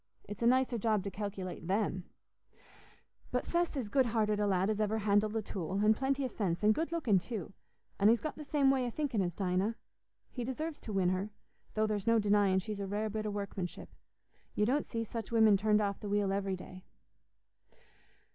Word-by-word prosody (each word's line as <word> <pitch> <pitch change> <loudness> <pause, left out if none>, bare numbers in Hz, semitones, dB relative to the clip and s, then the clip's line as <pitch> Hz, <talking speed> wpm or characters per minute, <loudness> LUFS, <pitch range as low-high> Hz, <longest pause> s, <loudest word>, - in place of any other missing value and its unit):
It's 205 +2 -8
a 235 - +3
nicer 255 -1 +3
job 215 -2 +1
to 200 - -4
calculate 190 -4 -5
them. 190 -2 0 1.2
But - - -1
Seth's 345 -3 0
as 250 -5 -2
good 260 +4 +2
hearted 215 -2 +1
a 205 - +2
lad 190 +1 +2
as 215 - -2
ever 215 +1 +1
handled 210 0 +2
a 220 - 0
tool, 185 -3 -5
and 210 +2 +4
plenty 270 +3 0
o' - - +1
sense, 195 -6 -2
and 215 +1 +6
good 325 +7 -2
looking 255 - +2
too; 200 -2 -6 0.5
and 205 +1 +6
he's 230 +1 +4
got 310 - -4
the 305 - -8
same 280 -2 +3
way 260 -2 +1
o' - - -1
thinking 260 -4 -1
as 175 -2 -2
Dinah. 190 +3 0 0.6
He 245 - -4
deserves 295 +6 -4
to 220 - -7
win 190 -2 +2
her, 185 +3 -1 0.5
though 215 0 +2
there's 210 -1 -2
no 230 0 +5
denying 205 -2 +3
she's 205 +2 -3
a 200 - -3
rare 210 +2 -2
bit 215 0 -3
o' - - -1
workmanship. 200 -3 -5 0.7
You 210 - +2
don't 270 +6 +1
see 230 -1 -2
such 225 -1 -6
women 220 -3 +6
turned 210 +1 +3
off 200 -1 -1
the 205 - -6
wheel 200 -1 +1
every 195 -1 -1
day." 185 0 -11
210 Hz, 205 wpm, -32 LUFS, 195-230 Hz, 1.2 s, and